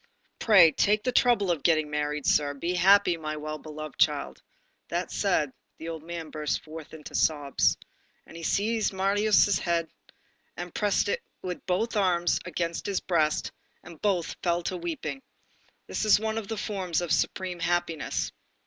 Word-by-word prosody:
Pray 190 Hz, -8 st, +7 dB
take 210 Hz, +8 st, +2 dB
the 250 Hz, -, 0 dB
trouble 240 Hz, -7 st, +3 dB
of 165 Hz, -4 st, -1 dB
getting 155 Hz, -2 st, +2 dB
married, 150 Hz, -1 st, -2 dB
sir. 145 Hz, -1 st, +2 dB
Be 170 Hz, +6 st, -2 dB
happy, 185 Hz, 0 st, +5 dB
my 155 Hz, -1 st, -4 dB
well 155 Hz, 0 st, -5 dB
beloved 155 Hz, -1 st, -8 dB
child." -, -, +1 dB, 0.5 s
That 175 Hz, +2 st, -3 dB
said, 155 Hz, -9 st, +1 dB, 0.2 s
the 165 Hz, -, -7 dB
old 160 Hz, -2 st, -5 dB
man 165 Hz, 0 st, -7 dB
burst 150 Hz, -1 st, -2 dB
forth 155 Hz, 0 st, -10 dB
into 150 Hz, -, -11 dB
sobs. 145 Hz, -3 st, +2 dB, 0.5 s
And -, -, -14 dB
he 165 Hz, -, -8 dB
seized 215 Hz, +6 st, +1 dB
Marius' 200 Hz, 0 st, +3 dB
head, 170 Hz, -2 st, -1 dB, 0.7 s
and 175 Hz, -1 st, -6 dB
pressed 205 Hz, -1 st, +1 dB
it -, -, -1 dB, 0.2 s
with 180 Hz, -1 st, -5 dB
both 215 Hz, +6 st, 0 dB
arms 180 Hz, -4 st, +2 dB
against 170 Hz, +2 st, -3 dB
his 200 Hz, -2 st, 0 dB
breast, 155 Hz, -4 st, 0 dB, 0.3 s
and 170 Hz, -3 st, -13 dB
both 190 Hz, -5 st, 0 dB
fell 175 Hz, -1 st, 0 dB
to 185 Hz, +1 st, -2 dB
weeping. 175 Hz, -, -4 dB, 0.6 s
This -, -, -3 dB
is 215 Hz, -1 st, +5 dB
one 220 Hz, +1 st, -1 dB
of 210 Hz, -, -8 dB
the 225 Hz, -, -4 dB
forms 190 Hz, -5 st, -2 dB
of 175 Hz, -3 st, -3 dB
supreme 180 Hz, +2 st, 0 dB
happiness. 175 Hz, -2 st, -1 dB
175 Hz, 165 wpm, -27 LUFS, 155-200 Hz, 0.7 s, Pray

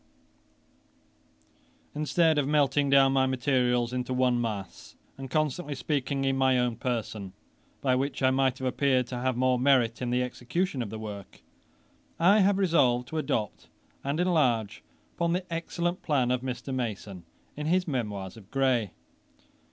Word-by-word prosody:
] -, -, -38 dB, 0.7 s
Instead 155 Hz, +1 st, +2 dB
of 140 Hz, -, 0 dB
melting 145 Hz, -1 st, +2 dB
down 135 Hz, -1 st, +5 dB
my 130 Hz, -1 st, +3 dB
materials 125 Hz, -2 st, +1 dB
into 125 Hz, 0 st, -2 dB
one 125 Hz, -1 st, +2 dB
mass, 105 Hz, -5 st, -6 dB, 0.2 s
and 135 Hz, -1 st, -8 dB
constantly 150 Hz, +1 st, -1 dB
speaking 140 Hz, -1 st, -2 dB
in 135 Hz, 0 st, +1 dB
my 130 Hz, -1 st, +3 dB
own 125 Hz, -2 st, 0 dB
person, 110 Hz, -6 st, -4 dB, 0.5 s
by 130 Hz, -2 st, +2 dB
which 135 Hz, +1 st, -2 dB
I 130 Hz, -, +5 dB
might 130 Hz, -1 st, +1 dB
have 130 Hz, -, -5 dB
appeared 130 Hz, 0 st, +1 dB
to 125 Hz, -, -4 dB
have 130 Hz, -1 st, -1 dB
more 130 Hz, 0 st, +2 dB
merit 125 Hz, -3 st, +3 dB
in 125 Hz, -, -2 dB
the 125 Hz, +1 st, +1 dB
execution 130 Hz, +5 st, -2 dB
of 115 Hz, -, -4 dB
the 110 Hz, -, -6 dB
work, 105 Hz, -3 st, -9 dB, 0.8 s
I 195 Hz, +6 st, +5 dB
have 200 Hz, 0 st, +3 dB
resolved 130 Hz, -10 st, +2 dB
to 160 Hz, -, -2 dB
adopt 110 Hz, -8 st, -3 dB, 0.4 s
and 140 Hz, +4 st, -2 dB
enlarge 130 Hz, -, +1 dB, 0.3 s
upon 170 Hz, 0 st, 0 dB
the 180 Hz, +1 st, -2 dB
excellent 175 Hz, +1 st, -2 dB
plan 130 Hz, -5 st, +1 dB
of 125 Hz, -1 st, 0 dB
Mr. 130 Hz, +1 st, -5 dB
Mason, 105 Hz, -7 st, -4 dB, 0.3 s
in 150 Hz, +1 st, -4 dB
his 180 Hz, +2 st, +1 dB
Memoirs 105 Hz, -, -4 dB
of 105 Hz, -3 st, -15 dB
Gray. 130 Hz, -8 st, +1 dB
130 Hz, 160 wpm, -28 LUFS, 120-145 Hz, 0.8 s, down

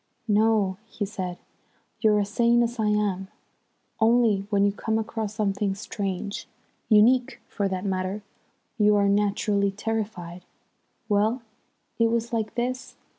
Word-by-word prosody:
"No," 210 Hz, -3 st, +3 dB
he 205 Hz, -, -3 dB
said, 185 Hz, -3 st, -5 dB, 0.6 s
"you're 215 Hz, -2 st, +4 dB
as 200 Hz, 0 st, -1 dB
sane 235 Hz, +2 st, +3 dB
as 235 Hz, 0 st, -3 dB
I 215 Hz, -, +2 dB
am, 205 Hz, -3 st, 0 dB, 0.7 s
only 220 Hz, -3 st, +3 dB
when 200 Hz, -1 st, +3 dB
you 200 Hz, -, +3 dB
come 220 Hz, +2 st, -1 dB
across 220 Hz, -1 st, -3 dB
something 200 Hz, -2 st, 0 dB
strange, 200 Hz, -1 st, -4 dB, 0.4 s
unique 245 Hz, +4 st, +4 dB
for 200 Hz, -2 st, -1 dB
that 190 Hz, 0 st, -3 dB
matter, 190 Hz, +1 st, -2 dB, 0.6 s
you 210 Hz, 0 st, +5 dB
are 200 Hz, -1 st, +3 dB
naturally 200 Hz, 0 st, +2 dB
terrified. 195 Hz, -4 st, -4 dB, 0.6 s
Well, 215 Hz, +4 st, +1 dB, 0.6 s
it 230 Hz, 0 st, +4 dB
was 235 Hz, +1 st, -1 dB
like 220 Hz, -2 st, -2 dB
this. 250 Hz, +1 st, -3 dB
210 Hz, 130 wpm, -26 LUFS, 200-225 Hz, 0.7 s, you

